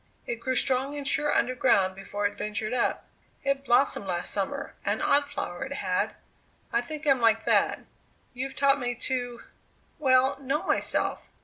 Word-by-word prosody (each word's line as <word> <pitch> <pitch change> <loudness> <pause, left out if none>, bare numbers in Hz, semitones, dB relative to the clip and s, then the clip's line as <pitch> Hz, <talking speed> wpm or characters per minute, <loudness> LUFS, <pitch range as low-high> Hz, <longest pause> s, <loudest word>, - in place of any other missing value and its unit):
It 235 - -4
grew 260 +2 -1
strong 265 +3 +1
and 280 -1 -3
sure 295 +2 +2
underground 240 -6 +2
before 200 +2 -4
it 205 0 0
ventured 210 +2 -3
up. 245 - 0 0.4
It 275 0 0
blossomed 240 -5 +2
last 175 -1 -1
summer; 195 -2 -3
an - - 0
odd 285 0 +3
flower 175 -9 -4
it 270 +1 -5
had. 185 -8 -1 0.6
I 235 - +3
think 305 +5 -7
I 290 - +5
am 260 -2 +3
like 225 -1 +3
that. - - +2 0.5
You've 265 +2 -5
taught 280 0 +3
me 245 -1 -2
to 245 -1 -3 0.6
well, 260 -2 +3
know 275 +4 -1
myself. - - 0
250 Hz, 170 wpm, -27 LUFS, 215-275 Hz, 0.6 s, I